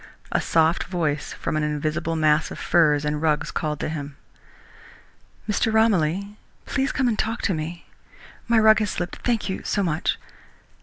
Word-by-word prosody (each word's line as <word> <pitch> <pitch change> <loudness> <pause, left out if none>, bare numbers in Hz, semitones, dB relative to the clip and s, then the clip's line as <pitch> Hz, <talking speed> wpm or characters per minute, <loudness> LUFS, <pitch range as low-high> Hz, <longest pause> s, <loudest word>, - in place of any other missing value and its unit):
A - - +1
soft 160 +1 +2
voice 155 -5 -2
from - - -3
an 155 - +1
invisible 155 +2 -1
mass 155 0 +2
of - - -8
furs 150 -4 +3
and 150 0 -1
rugs, 155 -1 +1
called 150 -2 -2
to - - -1
him. 145 -3 -6 1.3
"Mr. 220 +1 +1
Romilly, 200 -2 +1 0.3
please 270 0 0
come 265 -3 +1
and 225 -3 0
talk 225 +1 -1
to 195 - +1
me. 165 +2 -5 0.6
My 235 -1 +3
rug 220 0 +6
has 210 -1 0
slipped 175 -1 -4
thank 235 -3 -1
you 190 - -3
so 200 - 0
much. 160 -3 0
165 Hz, 165 wpm, -24 LUFS, 155-210 Hz, 1.3 s, rug